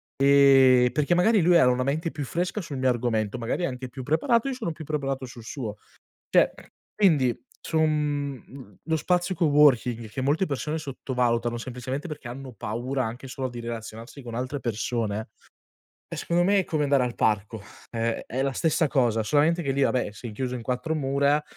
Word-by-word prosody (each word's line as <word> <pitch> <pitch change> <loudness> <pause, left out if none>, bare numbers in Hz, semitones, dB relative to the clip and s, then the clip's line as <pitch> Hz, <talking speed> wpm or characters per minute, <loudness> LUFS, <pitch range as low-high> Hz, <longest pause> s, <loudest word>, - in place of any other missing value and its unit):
Ehm, 135 -3 +6
perché 150 +4 +1
magari 195 +4 +4
lui 175 +1 +4
era 145 -7 +6
una 125 +1 +1
mente 155 +5 -1
più 145 -2 -5
fresca 180 +8 -2
sul 145 -5 -6
mio 130 0 +1
argomento, 120 -2 0
magari 120 +9 -2
è - - +2
anche 130 -1 -6
più 130 +1 -8
preparato, 230 - +2
e - - -1
io - - -4
sono 220 -9 -3
più 155 -1 -9
preparato 135 -3 -2
sul 125 -2 -11
suo. 110 -3 -5 0.6
Cioè - - +5 0.4
quindi, 140 - +3 0.2
su 160 - -2
un 145 -7 -2
lo 160 0 0
spazio 180 +3 0
coworking 130 -7 +3
che 130 - -4
molte 150 +8 +1
persone 150 +2 -2
sottovalutano, 125 -4 -1
semplicemente 130 +6 -5
perché 150 -5 -7
hanno 130 +1 -8
paura, 120 +5 -3
anche 120 +4 -6
solo 130 0 -4
di 120 -1 -8
relazionarsi 115 +3 -7
con 120 -1 -8
altre 130 +3 -3
persone, 110 -2 -2 0.8
eh - - -6
secondo 170 +1 +1
me 200 +2 +4
è - - -2
come 155 -3 -1
andare 140 -2 +3
al 120 -1 -3
parco, 105 0 0 0.3
è 115 0 -2
è 130 +3 -2
la 135 0 0
stessa 160 +3 +1
cosa, 120 -6 +2
solamente 155 +6 +2
che 135 -2 -1
lì, 140 +1 0
vabbè, 125 -6 +1
sei 115 +2 -8
chiuso 125 +3 -3
in 120 - -5
4 125 +7 -2
mura, 140 0 +1
135 Hz, 190 wpm, -26 LUFS, 120-150 Hz, 0.8 s, Ehm